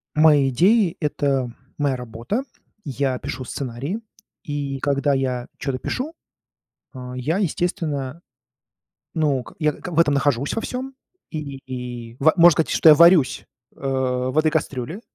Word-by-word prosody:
Мои 150 -3 +5
идеи 185 - +3
это 140 -5 0 0.3
моя 140 -3 +1
работа. 125 - -4 0.4
Я 135 -2 -1
пишу 130 +1 -5
сценарии, 135 - -4 0.4
и 145 -2 -3
когда 140 0 +1
я 130 -2 -1
чё-то 135 -2 -2
пишу, 285 - -4 0.8
а 125 -1 -8
я, 140 +8 -1
естественно, 165 -6 -2 0.9
ну 145 -5 +1
ка - - -14
я 150 -1 +2
к - - -8
в 165 - +1
этом 150 -4 +4
нахожусь, 140 -1 +1
во - - -1
всём, 260 +3 -5 0.4
и 150 -4 -5
и 125 -3 -6
и - - -21
ва 155 +3 +5
можно 175 0 +8
сказать, 160 0 +1
что 160 - +5
я 150 - +9
варюсь, 170 -3 +5 0.3
э, - - -21
в 130 0 -1
этой 155 0 +4
кастрюле. 150 - -3
140 Hz, 150 wpm, -22 LUFS, 130-160 Hz, 0.9 s, я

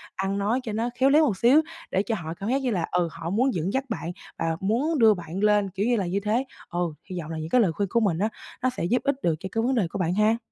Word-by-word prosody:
ăn 195 +1 -1
nói 210 +5 +1
cho 230 - -4
nó 230 +3 -1
khéo 270 - +5
léo 305 +3 +5
một 210 -9 0
xíu 260 +9 +5 0.3
để 190 - +2
cho 225 - -1
họ 160 -5 -5
cảm 200 +5 -5
giác 270 +2 +1
như 255 - 0
là, 175 -6 0
ừ, 175 -1 +2
họ 165 0 -6
muốn 250 +8 +2
dẫn 180 +2 -2
dắt 265 - +1
bạn 175 -6 -3 0.3
và 165 0 0
muốn 260 +10 +1
đưa 220 -2 +7
bạn 175 -1 -6
lên, 210 -1 +3
kiểu 195 +2 -2
như 245 +1 +3
là, 200 -4 0
như 180 +3 -1
thế. 215 +5 0 0.3
Ừ, 175 -2 -1 0.2
hy 180 -1 -4
vọng 160 -1 -6
là 160 - -4
những 155 +1 -5
cái 250 - +4
lời 185 - +3
khuyên 200 +3 -2
của 235 - +2
mình 195 -7 +1
á, 215 +3 +1 0.3
nó 255 - +2
sẽ 255 - -5
giúp 235 +7 +1
ích 280 0 +1
được 165 -2 +2
cho 190 +1 -6
cái 225 - 0
vấn 260 +2 +1
đề 205 -8 +2
của 195 - -6
bạn 175 -1 +1
ha. 215 +3 +3
205 Hz, 310 wpm, -25 LUFS, 175-240 Hz, 0.3 s, đưa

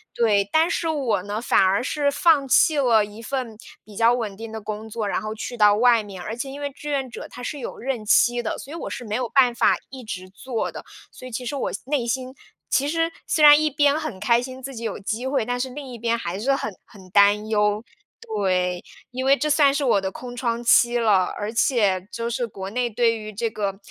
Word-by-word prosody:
对。 205 -4 +2
但 320 +1 +4
是 330 - -1
我 255 - 0
呢， 205 +2 -4
反 240 - +3
而 190 +4 +2
是 285 +1 0
放 285 -1 +3
弃 300 +3 +4
了 225 -5 +4
一 210 +2 -11
份 245 -2 -4 0.3
比 210 -2 -14
较 230 +2 +4
稳 215 -5 -4
定 225 +1 -8
的 220 - -5
工 215 +1 -6
作， 215 -1 -3
然 190 - -1
后 215 0 -5
去 245 +2 -6
到 210 -2 +5
外 235 0 +4
面， 195 -3 -9
而 215 +5 -5
且 270 +3 -5
因 280 +2 -8
为 285 -1 -4
志 295 +2 -8
愿 275 -2 -1
者 - - -8
它 250 - -10
是 290 +2 -4
有 - - -6
任 250 -4 -3
期 240 +3 +3
的， 220 - -3
所 280 - -10
以 - - -6
我 335 - -5
是 245 - -6
没 215 0 -3
有 245 -2 -2
办 255 -3 +4
法 - - +3
一 260 -1 -10
直 185 -3 -6
做 225 +5 -4
的。 - - -9 0.3
所 - - -12
以 - - -10
其 250 +2 -5
实 285 - -3
我 270 - -2
内 270 -4 -1
心 255 +1 -3 0.4
其 280 +1 +2
实 330 +1 0 0.2
虽 305 - +1
然 295 0 +9
一 310 - +2
边 290 +1 +2
很 310 -12 -5
开 235 0 +3
心 255 +1 -8
自 270 0 -6
己 230 - -7
有 215 - -3
机 225 +6 -3
会， 270 -4 0
但 245 0 -2
是 260 +1 -2
另 280 0 -8
一 240 - -7
边 235 +1 0
还 180 -4 -4
是 270 +5 +1
很 215 -6 -4
很 190 -2 -16
担 205 +2 +4
忧。 210 0 +1 0.4
对， 185 -4 -1 0.3
因 255 +1 -4
为 275 +1 +6
这 300 - -1
算 285 -2 +4
是 285 0 -1
我 235 -6 +3
的 190 - -2
空 245 +4 -8
窗 235 -1 -2
期 240 0 +4
了， 210 -6 +3
而 210 +1 -3
且 205 -6 +1
就 235 0 -3
是 240 0 -1
国 195 -3 -7
内 245 +2 -1
对 230 0 +1
于 215 -1 -8
这 230 +2 -2
个 200 -2 -3
235 Hz, 265 characters per minute, -23 LUFS, 210-265 Hz, 0.4 s, 然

